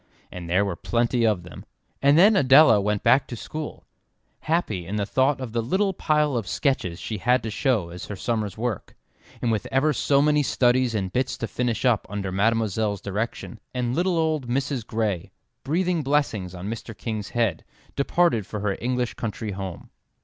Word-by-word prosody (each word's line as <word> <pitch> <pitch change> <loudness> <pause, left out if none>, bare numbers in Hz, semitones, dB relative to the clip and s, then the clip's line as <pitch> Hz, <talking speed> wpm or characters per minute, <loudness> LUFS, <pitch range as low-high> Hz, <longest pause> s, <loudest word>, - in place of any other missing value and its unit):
And 90 -2 -7
there 95 +4 +3
were 95 -3 -2
plenty 120 +2 +1
of 100 -5 0
them. 90 - -11 0.4
And 140 +2 +5
then 205 +5 +7
Adela 135 - +6
went 105 0 -1
back 130 +1 +4
to 120 - -6
school, 155 +6 -7 0.5
happy 110 - -1
in 100 - -4
the 105 -1 0
thought 130 +6 +1
of 130 -4 -5
the 115 +1 0
little 190 - 0
pile 150 -5 +1
of 115 -5 -2
sketches 90 - -1
she 110 -3 -5
had 125 +3 +2
to 110 - -4
show 110 - 0
as 90 +1 -8
her 105 - -5
summer's 110 0 -2
work, 115 -3 -4 0.5
and 120 - +2
with 110 +2 -1
ever 145 +3 +2
so 140 -1 +2
many 150 +1 +3
studies 125 -3 +2
and 95 -3 -2
bits 130 0 -1
to 115 - -3
finish 120 +3 -2
up 120 -5 +2
under 100 -2 -3
Mademoiselle's 105 0 +1
direction; 110 +3 -4 0.2
and 125 0 -1
little 175 +1 +1
old 155 -5 0
Mrs. 130 -1 -2
Gray, 105 -6 -2 0.3
breathing 175 +4 0
blessings 130 -11 0
on 90 +2 -6
Mr. 115 0 -6
King's 110 -4 -4
head, 115 -9 0 0.3
departed 140 - +1
for 105 - -5
her 100 -2 0
English 125 0 -1
country 110 -1 -4
home. 95 -2 -7
115 Hz, 185 wpm, -24 LUFS, 105-140 Hz, 0.5 s, then